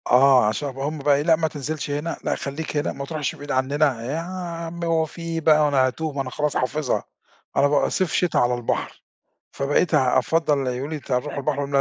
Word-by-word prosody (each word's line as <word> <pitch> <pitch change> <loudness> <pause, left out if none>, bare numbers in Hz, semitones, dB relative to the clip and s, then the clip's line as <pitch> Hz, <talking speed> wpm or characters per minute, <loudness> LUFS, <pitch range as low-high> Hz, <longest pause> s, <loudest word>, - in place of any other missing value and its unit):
آه 130 -1 +6
عشان 140 +7 -1
هُم 145 +3 -3
بقي 140 0 +3
إيه، 140 - +1
لأ 165 +2 +4
ما 160 0 0
تنزِلش 150 0 -4
هنا، 150 +4 -2
لأ - - 0
خلّيك 150 +2 -4
هنا، 145 - 0
ما 140 - -6
تروحش 150 -2 -3
بعيد 145 0 -7
عننا، 135 -1 +1
يا 140 +6 -2
عم 170 -1 -5
هو 165 -1 +2
في 160 - -11
إيه 165 -1 -3
بقى 155 -1 +5
هو 150 - +4
أنا 135 -2 +3
هاتوه، 155 +4 -3
ما 140 - -2
أنا 130 - -4
خلاص 150 +2 -1
حافظها، 140 +2 -1 0.5
أنا 140 - +5
بابقى 145 0 +2
صيف 185 -4 0
شِتا 180 - +1
على 120 0 +3
البحر. 120 -1 -3 0.5
فبقيت 145 +4 +1
أفضّل 140 +4 +3
يقولو 125 +2 -2
لي: 155 - -3
"أنت 145 - -11
هتروح 130 +3 -1
البحر؟" 140 0 -1
اقول 140 0 -3
لهم: - - +3
145 Hz, 225 wpm, -23 LUFS, 135-160 Hz, 0.5 s, آه